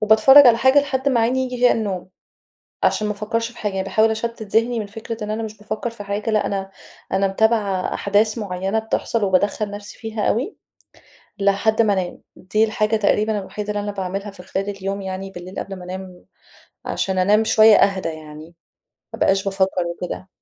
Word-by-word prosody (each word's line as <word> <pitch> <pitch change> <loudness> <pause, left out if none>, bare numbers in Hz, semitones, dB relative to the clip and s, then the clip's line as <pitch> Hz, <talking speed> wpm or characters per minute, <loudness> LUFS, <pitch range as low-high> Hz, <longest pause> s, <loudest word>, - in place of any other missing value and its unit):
وباتفرّج 220 +6 +7
على 230 -1 +7
حاجة 260 +4 +5
لحد 275 -1 -1
ما 240 -4 +2
عيني 255 +3 +1
ييجي 250 -1 -4
فيها 245 0 +4
النوم. 195 -5 -3 0.8
عشان 215 - +2
ما 210 - -1
أفكّرش 230 +3 -2
في 235 - -18
حاجة. 210 -3 -2
يعني 190 0 -2
باحاول 220 +3 +2
أشتت 230 0 -4
ذهني 230 +3 +1
من 210 - -3
فكرة 220 +1 -7
إن 210 - -3
أنا 225 +1 -3
مش 215 -1 -7
بافكّر 215 +3 -4
في 225 -3 -9
حاجة 205 +3 -3
لأ، 215 - +2
أنا 195 -1 -3 0.4
أنا 195 0 +2
متابعة 200 -2 +1
أحداث 210 +3 +1
معيّنة 195 +1 -2
بتحصل، 220 0 -2
وبادخّّل 200 +2 +1
نفسي 205 0 -9
فيها 220 -2 -5
أوي 260 - -1 0.8
لحد 200 +3 +2
ما 210 -2 +3
أنام. 185 -2 -3
دي 215 +4 0
الحاجة 215 0 +1
تقريبًا 215 0 +1
الوحيدة 205 +2 -6
اللي 210 0 -1
أنا 205 0 -3
باعملها 195 +1 -4
في 180 -2 -12
خلال 195 +1 -3
اليوم 195 0 -4
يعني 190 0 -5
بالليل 180 +1 -8
قبل 195 - -6
ما 180 - -10
أنام. 185 0 -8 0.6
عشان 190 -1 -2
أنام 205 +4 +4
شوية 220 -1 +6
أهدى 195 -3 +2
يعني 155 -1 -9 0.7
ما - - -5
أبقاش 195 +1 +2
بافكّر 190 -2 0
وكده. 180 +2 -6
210 Hz, 190 wpm, -21 LUFS, 195-220 Hz, 0.8 s, وباتفرّج